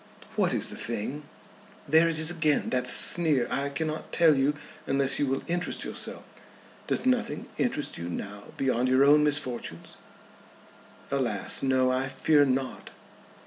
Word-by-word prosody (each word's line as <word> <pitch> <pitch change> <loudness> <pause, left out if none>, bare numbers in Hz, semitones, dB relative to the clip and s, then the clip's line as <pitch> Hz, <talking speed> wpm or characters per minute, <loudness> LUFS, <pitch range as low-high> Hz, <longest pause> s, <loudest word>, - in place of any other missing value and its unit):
"What - - +1
is - - -1
the - - -8
thing?" 120 +6 -4 0.6
"There 160 +3 +5
it 165 - -2
is 160 +2 +3
again; 155 -4 0
that 125 -1 +1
sneer. 150 -2 +5
I 140 +2 -1
cannot 155 +2 -4
tell 165 -3 +4
you 140 +2 +1 0.3
unless 135 0 +1
you 145 - +1
will 135 +1 -2
interest 175 +1 -3
yourself. - - -5 0.6
Does - - -1
nothing 245 -3 0
interest 235 -12 -2
you 85 +1 -5
now 100 +3 -7
beyond 130 -2 0
your 130 +1 +4
own 150 +1 +5
misfortunes?" 130 - -3 1.1
"Alas, 120 -8 -1
no. 130 -1 +2
I 130 +1 -1
fear 145 +2 +2
not." 130 0 -3
140 Hz, 145 wpm, -27 LUFS, 130-155 Hz, 1.1 s, There